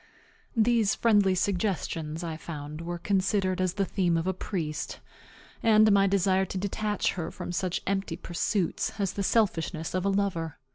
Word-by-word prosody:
These 225 -2 +3
friendly 205 -5 +4
suggestions, 180 -4 -1
I 165 -2 -3
found, 155 -1 -7
were 175 +1 -4
considered 190 0 +1
as 185 -1 +1
the 195 - +1
theme 175 -3 +1
of 165 - -1
a 190 - +1
priest, 165 -5 -4 0.6
and 215 -1 +5
my 195 0 +5
desire 190 0 +2
to 190 - -4
detach 205 +2 -1
her 170 -4 -4
from - - -6
such 180 0 -2
empty 195 0 -1
pursuits 180 +1 -1
as 195 -2 0
the 200 - -3
selfishness 180 -6 0
of 185 -1 0
a 200 - +2
lover. 195 -5 -1
190 Hz, 160 wpm, -28 LUFS, 170-200 Hz, 0.6 s, and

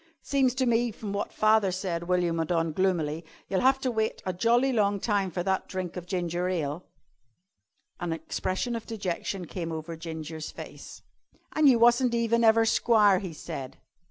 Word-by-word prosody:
"Seems 265 -3 +1
to 260 0 +1
me 240 0 +2
from 210 -1 -6
wot 200 - -3
father 215 -2 +3
said," 180 -2 -3
went 180 0 +2
on 170 -1 0
William 165 -1 0
gloomily, 165 -3 0 0.2
"you'll 190 - 0
have 265 +1 +4
to 255 - 0
wait 220 -1 -1
a 185 - -1
jolly 240 +7 +2
long 205 -3 +2
time 200 -2 0
for 175 0 -3
that 190 0 -1
drink 185 -2 -5
of 180 -1 -7
ginger 175 0 -1
ale." 160 -2 -3 1.1
An 175 -1 -3
expression 185 +8 -2
of 230 - -6
dejection 195 -3 -3
came 165 0 -5
over 160 +1 -5
Ginger's 160 -1 -6
face. - - -10 0.5
"An' 310 -1 +4
you 255 -3 +6
wasn't 240 +1 +4
even 235 0 +2
ever 225 0 +5
squire," 210 -4 +4
he 185 -4 -6
said. 135 -4 -7
190 Hz, 175 wpm, -27 LUFS, 170-230 Hz, 1.1 s, you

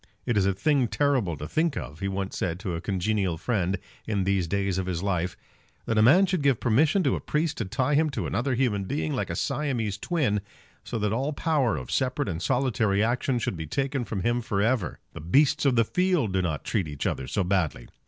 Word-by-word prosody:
"It 120 - 0
is 100 -2 +3
a 100 - +2
thing 135 +4 +2
terrible 125 - +1
to 75 - -6
think 160 - 0
of," 75 +3 -6
he 100 - -2
once 95 0 -3
said 85 -1 -2
to 90 - -3
a 85 - -3
congenial 95 -2 0
friend 95 -1 0 0.3
in 100 -3 0
these 95 -2 +1
days 100 0 0
of 95 - -3
his 90 -1 -2
life, 90 -3 -1 0.5
"that 115 -1 +1
a - - +6
man 165 - +6
should 185 -3 -1
give 140 -5 +3
permission 150 - +3
to - - +2
a - - -3
priest 155 0 -1
to 115 - -1
tie 130 +8 0
him 155 +2 +3
to 140 - -3
another 130 +1 0
human 110 -6 0
being 80 -3 -2
like - - -2
a - - -2
Siamese 115 -9 -1
twin, 130 - 0 0.4
so - - -4
that 105 -1 0
all 135 +6 -1
power 145 -6 +1
of 65 - -7
separate 130 -2 0
and 85 -2 -3
solitary 110 -4 +1
action 125 +2 0
should 115 - -2
be 80 -2 -6
taken 135 - -1
from 105 -4 -4
him 120 +5 +1
for 110 -4 -2
ever! 115 -1 +1 0.2
The - - -8
beasts 135 - +3
of 130 - +3
the 115 -1 +4
field 180 - +1
do 95 - +2
not 80 -5 -2
treat 95 -7 0
each 75 -2 -5
other 65 - -2
so 100 - 0
badly. 90 -9 -1
110 Hz, 230 wpm, -26 LUFS, 95-135 Hz, 0.5 s, a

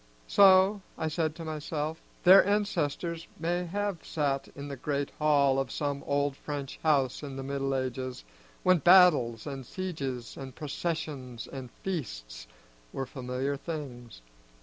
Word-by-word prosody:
So, 195 - +6 0.2
I 160 - -1
said 155 -1 -1
to 165 -1 -7
myself, 155 0 -3 0.2
their 190 +2 +9
ancestors 170 -5 -1
may 175 +2 -1
have 200 0 -3
sat 140 -3 -1
in 140 0 -7
the 140 - -5
great 140 +1 -2
hall 140 -3 +4
of 135 - -1
some 145 -1 -2
old 140 -1 +1
French 140 -2 -6
house 140 -5 +2
in 140 -2 -6
the 135 - -5
Middle 135 0 -1
Ages, 130 - -3 0.4
when 185 -1 +5
battles 150 -9 +6
and 135 -2 -5
sieges 135 - -5
and 135 -2 -8
processions 145 -6 -4
and 130 -2 -7
feasts - - -5 0.4
were 135 - -3
familiar 130 +1 -3
things. 130 - -7
145 Hz, 140 wpm, -29 LUFS, 135-165 Hz, 0.4 s, their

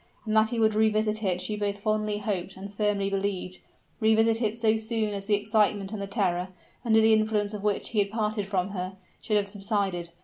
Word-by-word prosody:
And 215 0 -1
that 220 0 +4
he 235 - -3
would 220 -1 +3
revisit 215 0 +1
it 180 -3 0
she 210 +3 -2
both 205 -1 -2
fondly 215 0 -1
hoped 195 -3 -3
and 200 +1 -8
firmly 205 -1 0
believed 195 -2 -2 0.4
revisit 225 +1 +3
it 220 -1 0
so 225 -1 +3
soon 220 -1 -1
as 200 0 -4
the 210 - +4
excitement 205 -1 +1
and 210 - -4
the 200 - -4
terror, 185 -4 0 0.4
under 220 -2 +4
the 220 0 +5
influence 215 -1 +1
of 210 - -5
which 205 -1 0
he 220 - 0
had 200 0 +2
parted 210 -1 -2
from 190 -1 -1
her, 185 -1 -5 0.2
should 215 - +1
have 200 -1 0
subsided. 195 -4 -2
210 Hz, 210 wpm, -27 LUFS, 200-220 Hz, 0.4 s, the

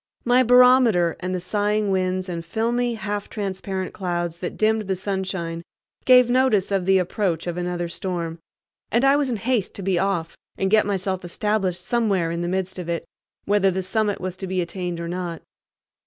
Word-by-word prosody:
My 245 +1 +5
barometer 250 -8 +5
and 185 +1 -3
the - - -2
sighing 205 +2 0
winds 185 0 0
and 170 -2 -4
filmy 235 +6 -1
half 205 -2 -4
transparent 190 -2 -4
clouds 175 -3 -3
that 175 - -5
dimmed 215 -1 +1
the 190 - 0
sunshine 185 -3 -3 0.4
gave 250 -1 +7
notice 245 -6 +2
of 190 -2 0
the 190 0 +5
approach 180 -2 -1
of 175 -1 -3
another 175 -1 -2
storm, 170 -2 -4 0.5
and 240 +4 +3
I 275 +1 +6
was 285 -2 +1
in 235 - -1
haste 230 -1 -1
to 200 - -5
be 185 -2 +1
off 175 -4 -1 0.2
and 190 0 0
get 215 -1 +4
myself 190 -2 -2
established 185 -1 -1
somewhere 200 -8 +1
in 170 0 -3
the 175 - -2
midst 185 0 -2
of 175 -2 -6
it, 170 -1 -2 0.4
whether 200 -1 +3
the 190 0 -2
summit 205 +2 0
was 185 0 -5
to 190 - -5
be 185 0 -1
attained 175 0 -3
or 170 - -4
not. 175 -1 -4
190 Hz, 185 wpm, -23 LUFS, 175-215 Hz, 0.5 s, gave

